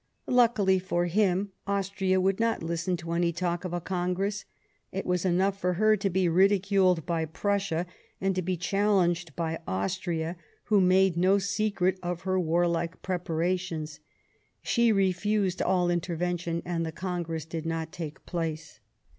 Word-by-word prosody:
Luckily 225 -6 +3
for 175 -1 -1
him, 195 +1 +1 0.2
Austria 195 -1 0
would 190 +2 +1
not 230 -5 0
listen 170 +2 -1
to 170 0 -7
any 170 0 +1
talk 175 +1 -2
of 180 - -4
a 175 - -1
Congress; 185 +3 -2 0.5
it 195 - -4
was 180 0 0
enough 190 +2 +1
for 180 0 +1
her 215 +4 +4
to 200 -1 -1
be 185 0 +1
ridiculed 190 -1 +3
by 165 -2 0
Prussia, 185 +1 -1 0.3
and 195 0 +1
to 185 - -1
be 185 0 -2
challenged 180 -3 +1
by 165 -1 -2
Italy, 160 - -2 0.3
who 205 -2 +3
made 185 -1 +4
no 185 +3 +4
secret 200 -2 0
of 175 -1 -3
her 185 0 0
warlike 170 0 0
preparations; 170 -3 -2 0.6
she 235 -1 +3
refused 195 0 +1
all 180 -2 +2
intervention, 170 -1 -2
and 170 -1 -1
the 160 - -3
Congress 170 -3 -4
did 165 0 -5
not 165 -1 -3
take 165 -5 -7
place. 165 -3 -4
180 Hz, 150 wpm, -28 LUFS, 170-195 Hz, 0.6 s, her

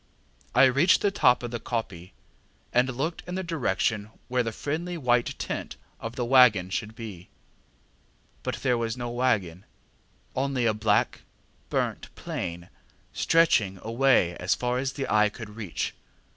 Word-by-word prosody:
I 125 - +7
reached 140 +8 +5
the 205 - +2
top 125 -10 +3
of 120 - -4
the 120 - -3
koppie, 100 -7 -5 0.6
and 125 +2 +3
looked 160 +5 -2
in 180 - -4
the 190 - -2
direction 120 - -1 0.2
where 125 0 +2
the 115 -1 -2
friendly 165 +8 -3
white 125 -5 +1
tent - - -4 0.2
of 115 +1 -6
the 120 - -1
waggon 115 -8 +5
should 110 +2 -3
be, 100 -6 -9 1.1
but - - -3
there 125 -3 +2
was 115 +1 -2
no 120 -1 -4
waggon, 105 -8 0 0.7
only 130 -2 0
a 110 - +3
black 105 -1 +1 0.5
burnt - - -2
plain 85 0 -5 0.4
stretching 115 - +3
away 115 -6 +3
as 90 +3 +1
far 125 0 -1
as 135 0 -2
the 135 - -3
eye 105 0 +4
could 105 0 -9
reach. 105 -5 -4
120 Hz, 150 wpm, -27 LUFS, 105-135 Hz, 1.1 s, I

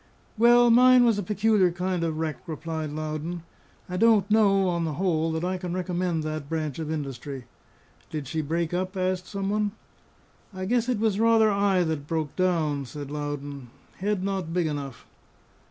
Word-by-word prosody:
"Well, 240 +1 +6
mine 250 +1 +7
was 225 -3 +3
a - - 0
peculiar 205 -1 +2
kind 180 0 -2
of 160 -2 -1
wreck," 160 +2 -4
replied 160 -1 -4
Loudon. 155 +2 -4 0.4
"I 180 - -4
don't 215 -1 +4
know, 200 -3 +4
on 170 -1 0
the 160 -2 -2
whole, 165 -2 0
that 160 +2 -2
I 185 0 -2
can 180 0 -4
recommend 180 -3 -1
that 155 -2 -4
branch 155 -3 -3
of 155 -1 -4
industry." 140 -3 -5 0.6
"Did 150 -3 -5
she 155 +3 -2
break 165 +3 -2
up?" 185 +2 -2
asked 185 0 -1
some 195 -1 -3
one. 210 -1 0 0.8
"I 185 0 -4
guess 240 +3 +1
it 245 - +1
was 210 -2 0
rather 225 -1 +4
I 200 -2 +2
that 155 -3 -3
broke 155 -3 -2
down," 160 -6 0
says 145 +2 -8
Loudon. 145 -3 -5 0.3
"Head 200 0 -1
not 190 -4 -2
big 175 0 +1
enough." 145 -4 -5
175 Hz, 175 wpm, -26 LUFS, 155-200 Hz, 0.8 s, mine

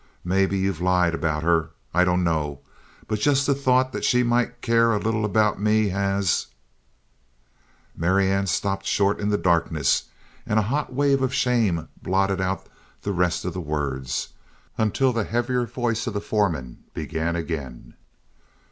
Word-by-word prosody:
Maybe 95 +2 +1
you've 95 -3 -1
lied 90 -2 +2
about 80 -2 -1
her. 80 -1 +2 0.2
I 90 +2 +4
dunno. 80 -6 0 0.5
But 110 -1 -1
just 140 +3 +2
the 140 - +3
thought 130 -1 +2
that - - -5
she 125 0 +3
might 120 0 0
care 115 -1 +3
a - - +2
little 110 0 -1
about 105 -1 +1
me 105 0 +3
has 100 -1 0 0.8
" - - -38
Marianne 95 +3 +1
stopped 95 +1 -1
short 100 +1 +2
in 105 - -1
the 105 - +2
darkness 80 -6 +1 0.4
and 110 - -1
a 110 - +4
hot 140 +8 -2
wave 140 +1 +2
of 130 0 0
shame 115 -11 +1
blotted 95 0 +1
out 95 +1 -2 0.4
the 100 - -1
rest 90 -1 0
of - - -2
the 90 - -4
words 70 -4 -3 0.5
until 125 +4 +1
the 115 -2 0
heavier 120 +2 -1
voice 115 -1 -2
of 110 - -3
the - - 0
foreman 85 - -1 0.2
began 80 +2 -2
again. 70 -8 -5
95 Hz, 155 wpm, -24 LUFS, 85-115 Hz, 0.8 s, I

